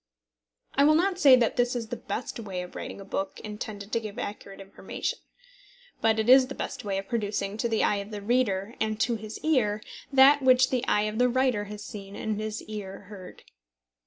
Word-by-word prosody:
I 280 Hz, -, +4 dB
will 305 Hz, +2 st, +6 dB
not 375 Hz, +3 st, +1 dB
say 275 Hz, -6 st, +8 dB
that 240 Hz, -3 st, +1 dB
this 245 Hz, 0 st, +2 dB
is 230 Hz, -2 st, -4 dB
the -, -, -3 dB
best 240 Hz, -, -5 dB
way 190 Hz, -5 st, -4 dB
of 180 Hz, -, -11 dB
writing -, -, -6 dB
a 195 Hz, -, -9 dB
book 195 Hz, 0 st, -4 dB
intended 210 Hz, -1 st, -7 dB
to 230 Hz, -, +1 dB
give 215 Hz, -2 st, -8 dB
accurate 200 Hz, -1 st, -6 dB
information. 195 Hz, 0 st, -5 dB, 0.8 s
But 225 Hz, 0 st, +3 dB
it 220 Hz, 0 st, 0 dB
is 260 Hz, +1 st, +7 dB
the 275 Hz, -, -7 dB
best -, -, -5 dB
way 200 Hz, -2 st, -2 dB
of 195 Hz, 0 st, -5 dB
producing 205 Hz, -3 st, -2 dB
to 235 Hz, +1 st, -1 dB
the 225 Hz, -, +1 dB
eye 205 Hz, -, +2 dB
of 200 Hz, +1 st, -5 dB
the 205 Hz, -2 st, -7 dB
reader, 215 Hz, -3 st, +1 dB
and 215 Hz, -1 st, -1 dB
to 240 Hz, 0 st, +2 dB
his 215 Hz, 0 st, -7 dB
ear, 235 Hz, -10 st, +2 dB, 0.3 s
that 275 Hz, +1 st, +7 dB
which 255 Hz, -1 st, +5 dB
the 255 Hz, -2 st, 0 dB
eye 210 Hz, -, +3 dB
of 215 Hz, +1 st, -3 dB
the 250 Hz, 0 st, +4 dB
writer 250 Hz, -4 st, +1 dB
has 210 Hz, 0 st, -8 dB
seen 200 Hz, -1 st, -9 dB
and 215 Hz, -1 st, -3 dB
his 215 Hz, 0 st, -4 dB
ear 205 Hz, -3 st, -7 dB
heard. 195 Hz, -3 st, -11 dB
215 Hz, 215 wpm, -27 LUFS, 205-250 Hz, 0.8 s, say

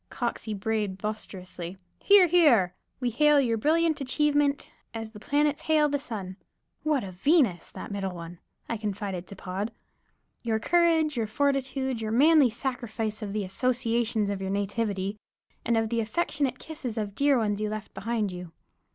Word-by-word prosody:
(Coxey 235 Hz, -3 st, -3 dB
brayed 210 Hz, -1 st, -1 dB
boisterously, 190 Hz, -3 st, -6 dB, 0.2 s
"Here, 400 Hz, -2 st, +7 dB
Here!") 290 Hz, -, +4 dB, 0.3 s
"We 250 Hz, -2 st, 0 dB
hail 295 Hz, +4 st, +5 dB
your 240 Hz, -4 st, +2 dB
brilliant 320 Hz, +3 st, +2 dB
achievement, 290 Hz, +1 st, +1 dB, 0.3 s
as 225 Hz, -1 st, -5 dB
the 210 Hz, -, -11 dB
planets 295 Hz, +5 st, +1 dB
hail 305 Hz, -1 st, +3 dB
the 285 Hz, 0 st, 0 dB
sun" 200 Hz, -9 st, -5 dB, 0.4 s
("What 305 Hz, -5 st, +1 dB
a 190 Hz, -, -6 dB
Venus 210 Hz, -, +2 dB
that -, -, -7 dB
middle 195 Hz, -2 st, -3 dB
one," 170 Hz, 0 st, -9 dB, 0.3 s
I 230 Hz, -, -2 dB
confided 200 Hz, -3 st, -4 dB
to 200 Hz, -, -9 dB
Pod) 195 Hz, +4 st, -4 dB, 0.7 s
"Your 225 Hz, -2 st, 0 dB
courage, 325 Hz, +3 st, +3 dB
your 225 Hz, -2 st, 0 dB
fortitude, 265 Hz, 0 st, 0 dB
your 215 Hz, -1 st, -2 dB
manly 290 Hz, +2 st, +6 dB
sacrifice 230 Hz, -3 st, -3 dB
of 205 Hz, -2 st, -4 dB
the 210 Hz, 0 st, -1 dB
associations 230 Hz, 0 st, 0 dB
of 195 Hz, -1 st, -4 dB
your 190 Hz, -, -3 dB
nativity 200 Hz, 0 st, -1 dB, 0.5 s
and 235 Hz, 0 st, +1 dB
of 225 Hz, -1 st, +1 dB
the 230 Hz, 0 st, 0 dB
affectionate 275 Hz, +1 st, -1 dB
kisses 285 Hz, -8 st, -6 dB
of 205 Hz, -2 st, -2 dB
dear 280 Hz, +3 st, +3 dB
ones 210 Hz, -3 st, 0 dB
left 215 Hz, 0 st, -4 dB
behind 220 Hz, -2 st, -1 dB
you. 180 Hz, -2 st, -8 dB
225 Hz, 160 wpm, -27 LUFS, 205-280 Hz, 0.7 s, Here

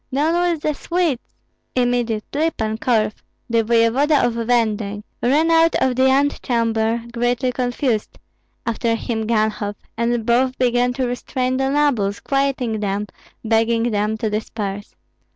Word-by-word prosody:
down 330 Hz, +6 st, +2 dB
with 320 Hz, -3 st, -4 dB
the 305 Hz, -, +1 dB
Swedes!" 335 Hz, -5 st, -1 dB, 0.5 s
Immediately 245 Hz, +4 st, 0 dB
Pan 220 Hz, 0 st, -2 dB
Korf, 220 Hz, -4 st, 0 dB, 0.3 s
the 230 Hz, -1 st, +2 dB
voevoda 235 Hz, +6 st, +3 dB
of 240 Hz, -, 0 dB
Venden, 220 Hz, -3 st, 0 dB, 0.2 s
ran 300 Hz, +7 st, +3 dB
out 330 Hz, 0 st, +4 dB
of 260 Hz, -1 st, +1 dB
the 260 Hz, +1 st, +4 dB
antechamber 230 Hz, -5 st, +1 dB
greatly 245 Hz, +2 st, 0 dB
confused; 245 Hz, -2 st, -1 dB, 0.5 s
after 230 Hz, 0 st, 0 dB
him 225 Hz, -1 st, -3 dB
Ganhoff; 215 Hz, -2 st, 0 dB, 0.2 s
and 235 Hz, 0 st, 0 dB
both 255 Hz, +2 st, +2 dB
began 245 Hz, 0 st, +2 dB
to 255 Hz, +1 st, -1 dB
restrain 255 Hz, +1 st, -2 dB
the 270 Hz, 0 st, 0 dB
nobles, 260 Hz, -9 st, +1 dB
quieting 270 Hz, -5 st, -1 dB
them, 205 Hz, 0 st, -1 dB, 0.4 s
begging 230 Hz, +1 st, +2 dB
them 210 Hz, +1 st, 0 dB
to 220 Hz, -, -2 dB
disperse. 205 Hz, -1 st, -4 dB
240 Hz, 135 wpm, -20 LUFS, 220-265 Hz, 0.5 s, out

